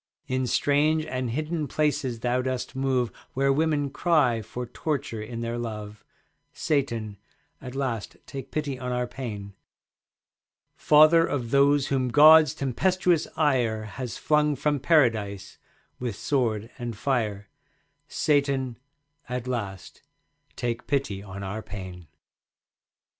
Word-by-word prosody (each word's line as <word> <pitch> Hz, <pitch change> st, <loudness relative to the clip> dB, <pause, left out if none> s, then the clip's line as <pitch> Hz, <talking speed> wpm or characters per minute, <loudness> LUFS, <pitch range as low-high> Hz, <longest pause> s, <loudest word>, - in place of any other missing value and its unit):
In 130 Hz, 0 st, -1 dB
strange 150 Hz, +5 st, +2 dB
and 130 Hz, -5 st, -3 dB
hidden 155 Hz, +4 st, -2 dB
places 140 Hz, -6 st, -1 dB
thou 125 Hz, +1 st, +1 dB
dost 130 Hz, -1 st, -3 dB
move 130 Hz, -3 st, 0 dB, 0.2 s
Where 135 Hz, +1 st, +2 dB
women 145 Hz, -2 st, +1 dB
cry 145 Hz, -8 st, +2 dB
for 125 Hz, +4 st, -6 dB
torture 135 Hz, -2 st, -3 dB
in 115 Hz, +2 st, -6 dB
their 115 Hz, +1 st, -3 dB
love. 105 Hz, -2 st, -6 dB, 0.5 s
Satan, 115 Hz, -8 st, -1 dB, 0.4 s
at 130 Hz, -1 st, -8 dB
last 125 Hz, -6 st, -3 dB
take 135 Hz, -1 st, -8 dB
pity 145 Hz, -4 st, -3 dB
on 125 Hz, -1 st, -4 dB
our 125 Hz, 0 st, 0 dB
pain. 105 Hz, -6 st, -7 dB, 1.2 s
Father 155 Hz, +2 st, +6 dB
of 125 Hz, -8 st, -2 dB
those 140 Hz, 0 st, +4 dB
whom 130 Hz, -2 st, +1 dB
God's 155 Hz, +4 st, +7 dB
tempestuous 175 Hz, +5 st, +1 dB
ire 125 Hz, -8 st, +1 dB
Has 115 Hz, +3 st, -6 dB
flung 150 Hz, -1 st, +2 dB
from 145 Hz, +1 st, 0 dB
Paradise 115 Hz, -, +1 dB, 0.4 s
with 120 Hz, -5 st, -3 dB
sword 115 Hz, -4 st, -1 dB
and 120 Hz, -3 st, -5 dB
fire, 105 Hz, -6 st, -1 dB, 0.6 s
Satan, 140 Hz, -4 st, 0 dB, 0.5 s
at 125 Hz, -1 st, -3 dB
last 105 Hz, -7 st, -5 dB, 0.5 s
take 120 Hz, -1 st, -3 dB
pity 135 Hz, -9 st, -1 dB
on 100 Hz, 0 st, -8 dB
our 100 Hz, +3 st, -4 dB
pain. 95 Hz, -4 st, -8 dB
130 Hz, 120 wpm, -26 LUFS, 115-145 Hz, 1.2 s, God's